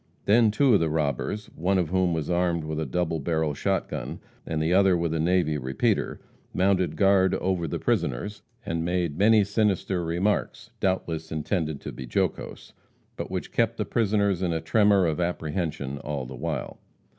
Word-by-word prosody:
Then 110 +2 +5
two 130 +4 +3
of 100 - +5
the 80 - +1
robbers, 80 +7 -1
one 95 +4 +1
of 90 -4 0
whom 95 0 +2
was 80 -3 -2
armed 85 -2 +1
with 80 0 -3
a 80 - -2
double 80 +3 -1
barrel 80 0 0
shot - - -1
gun - - -5 0.3
and 80 - -1
the 80 +3 +1
other 95 -1 +5
with 85 -1 -1
a 80 - -1
navy 80 -2 +1
repeater, 65 +1 -1 0.4
mounted 95 -1 +2
guard 95 -1 +4
over 90 -3 -1
the - - -3
prisoners, 105 - -1 0.2
and 85 0 -2
made 85 -3 -1
many 110 +1 +5
sinister 100 -3 0
remarks, 105 +5 -1
doubtless 85 -4 -1
intended 80 -1 -2
to - - -6
be 65 - -8
jocose, - - -2 0.4
but - - -5
which - - -4
kept - - +1
the - - -1
prisoners 100 -4 +1
in 90 -2 0
a 80 - 0
tremor 100 0 +3
of 80 0 -1
apprehension 80 -4 -2
all 70 -3 -4
the 65 - -8
while. - - -4
85 Hz, 180 wpm, -26 LUFS, 80-95 Hz, 0.4 s, Then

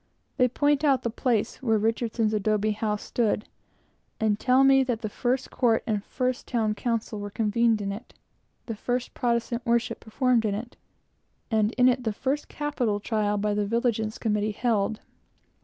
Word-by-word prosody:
They 250 -2 +5
point 290 +3 +1
out 275 -4 +3
the 235 - -1
place 230 -2 -1
where 225 -4 +2
Richardson's 225 0 0
adobe 215 0 +1
house 210 0 -2
stood, 220 -2 0 0.7
and 215 -1 +1
tell 260 +1 +4
me 270 0 +6
that 245 -3 -2
the 215 - -3
first 250 +5 -1
court 230 -3 +2
and 210 -3 -1
first 255 +1 -2
town 220 -4 0
council 225 -1 -2
were 205 0 -5
convened 225 +1 +1
in 200 - -2
it, 215 +5 -9 0.5
the 230 - -4
first 245 +3 -2
Protestant 235 -1 -1
worship 235 0 0
performed 245 +1 +1
in 205 -2 0
it, 235 +4 -7 0.8
and 215 -1 +2
in 250 0 +4
it 250 0 +2
the 220 -2 -1
first 275 +6 -2
capital 255 -8 -1
trial 210 -1 0
by 210 +1 0
the 205 0 0
Vigilance 230 -1 0
Committee 210 -1 0
held. 220 -2 0
230 Hz, 170 wpm, -26 LUFS, 215-250 Hz, 0.8 s, me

